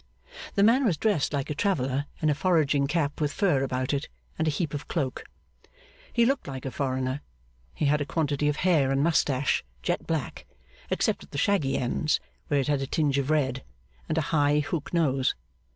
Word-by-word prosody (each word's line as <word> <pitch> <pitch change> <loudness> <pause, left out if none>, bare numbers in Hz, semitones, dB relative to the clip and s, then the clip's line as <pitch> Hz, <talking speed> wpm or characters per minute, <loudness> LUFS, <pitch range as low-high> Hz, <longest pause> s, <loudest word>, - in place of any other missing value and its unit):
The 200 - +4
man 240 +6 +5
was 190 -10 +2
dressed 200 -5 +1
like 140 0 -2
a - - +1
traveller, 140 -5 0 0.2
in 155 - +4
a - - +3
foraging 150 -4 +2
cap 150 -1 -1
with 150 -1 +1
fur 160 -6 +2
about 130 0 -1
it, 140 +1 -2 0.3
and 160 - +1
a - - +4
heap 155 +2 -2
of 145 - -5
cloak. 140 -7 -2 0.9
He 235 -1 +3
looked 270 - 0
like 135 -1 -6
a 135 - -3
foreigner. 130 0 -2 0.5
He 155 - -1
had 145 +1 +3
a - - 0
quantity 150 -2 0
of 150 - 0
hair 155 -7 +4
and 135 +1 +2
moustache 145 -4 +2 0.2
jet - - -1
black, - - -3 0.4
except - - 0
at - - -16
the - - -6
shaggy 155 -5 +2
ends, 140 +5 0 0.3
where 145 - +2
it 135 - -1
had 145 -2 +1
a 135 - -2
tinge 140 -2 +1
of 140 +1 -2
red 135 -4 +1 0.5
and 160 - 0
a - - +3
high 145 -1 +4
hook 150 0 -4
nose. 135 -6 +2
145 Hz, 200 wpm, -27 LUFS, 135-160 Hz, 0.9 s, man